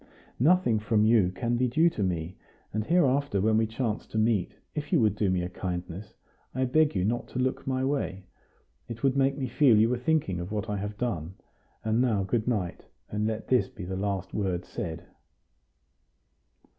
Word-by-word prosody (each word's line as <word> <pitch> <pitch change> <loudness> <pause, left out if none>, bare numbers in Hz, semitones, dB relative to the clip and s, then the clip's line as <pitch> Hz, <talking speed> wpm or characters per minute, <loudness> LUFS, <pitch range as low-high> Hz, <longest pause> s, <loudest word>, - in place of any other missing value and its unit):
"Nothing 140 -6 +4
from 105 0 +2
you 110 -5 +4
can 120 +5 -1
be 125 +1 +2
due 155 +7 +3
to - - -4
me; 90 -2 -2 0.4
and 110 +1 0
hereafter 140 - +2
when 110 +3 +2
we 110 0 +3
chance 110 -1 -3
to - - -5
meet, 110 -4 +1 0.2
if 150 -1 -5
you 170 - +4
would 105 -4 +3
do 105 -2 +1
me 90 -1 +1
a - - -2
kindness, 90 +1 -5 0.4
I 130 0 +1
beg 150 +2 +3
you 90 -1 +1
not 120 +3 -1
to - - -8
look 130 +1 -1
my 130 0 0
way. 135 -9 -2 0.6
It 115 -1 -8
would 135 -1 +3
make 135 0 +2
me 135 - -2
feel 125 -3 +4
you 110 +2 +4
were 125 0 0
thinking 125 - 0
of 90 +3 -6
what 105 0 -2
I 105 - -1
have 105 +1 -5
done. 95 -8 -3 0.5
And 110 +2 +2
now 110 -6 +2
good 110 +4 -1
night; 100 -8 -2 0.2
and 105 +1 0
let 110 0 -3
this 125 -1 +2
be 115 -8 -8
the 95 +1 -4
last 95 -1 -3
word 95 -4 -1
said." 85 -7 -5
110 Hz, 195 wpm, -28 LUFS, 95-130 Hz, 0.6 s, Nothing